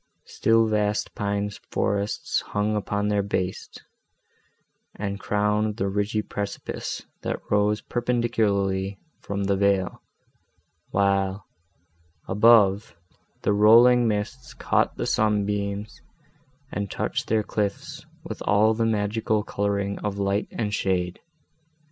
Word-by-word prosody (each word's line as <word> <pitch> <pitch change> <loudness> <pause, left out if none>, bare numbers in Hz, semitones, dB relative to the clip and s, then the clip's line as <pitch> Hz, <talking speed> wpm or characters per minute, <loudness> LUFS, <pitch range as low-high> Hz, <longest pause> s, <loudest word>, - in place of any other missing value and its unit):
Still 115 0 +2
vast 105 -1 0
pine 100 0 -2 0.2
forests 100 +1 -1
hung 105 +1 -1
upon 105 0 -1
their 105 -1 +2
base, 95 -2 -3 1.3
and 100 -1 -4
crowned 105 +1 0
the 100 - 0
ridgy 105 +2 -1
precipice, 100 -1 -5 0.2
that - - -3
rose 105 0 +2
perpendicularly 100 -5 0 0.2
from 100 0 -3
the 100 0 +1
vale, 100 -1 +1 0.9
while, 100 -1 +1 0.8
above, 105 -1 +4 0.5
the 105 - +2
rolling 120 +4 +6
mists 115 +5 -3
caught - - +1
the - - -2
sunbeams, 105 -1 -1 0.7
and 100 -1 -3
touched - - -2
their 110 -1 +2
cliffs 100 -1 -3 0.2
with - - -7
all 105 +2 +4
the 115 0 0
magical 110 0 0
colouring 100 -1 -2
of 105 -1 -3
light 100 +1 0
and 105 -3 -3
shade. 90 -3 -1
105 Hz, 110 wpm, -25 LUFS, 100-110 Hz, 1.3 s, rolling